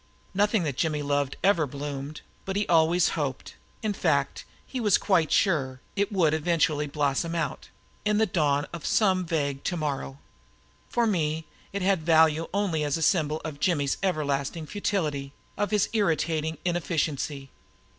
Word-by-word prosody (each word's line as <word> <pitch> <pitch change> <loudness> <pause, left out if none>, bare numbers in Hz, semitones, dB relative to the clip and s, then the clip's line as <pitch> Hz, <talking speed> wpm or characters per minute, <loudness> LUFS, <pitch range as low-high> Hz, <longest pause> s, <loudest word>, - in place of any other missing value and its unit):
Nothing 205 0 +2
that 140 -5 -3
Jimmy 150 -2 0
loved 145 -1 0
ever 185 -6 +3
bloomed; 140 +1 -6 0.2
but 190 - -4
he 205 +1 0
always 165 +1 +4
hoped, 140 -5 -3 0.3
in 215 -1 0
fact 140 -7 0 0.2
he 260 - -5
was 210 -5 +4
quite 170 -7 +2
sure, 135 -9 +2 0.2
it 200 +2 0
would 170 -6 +3
eventually 155 -1 +1
blossom 145 +3 -1
out 165 -2 -3 0.3
in 210 0 +2
the 220 - +4
dawn 145 -6 +1
of 170 - -6
some 185 -4 +2
vague 145 -4 -1
tomorrow. 145 -6 -2 0.7
For 240 -1 +1
me 160 -6 0 0.3
it 200 -1 -3
had 190 -3 +2
value 160 0 +4
only 190 -6 0
as 145 +1 0
a 165 - -2
symbol 155 -3 +2
of 150 -3 -6
Jimmy's 145 -6 +1
everlasting 155 -3 -1
futility, 150 -8 -2 0.2
of 205 0 -1
his 210 -1 +2
irritating 160 -5 0
inefficiency. 155 -5 -1
160 Hz, 150 wpm, -27 LUFS, 145-185 Hz, 0.7 s, always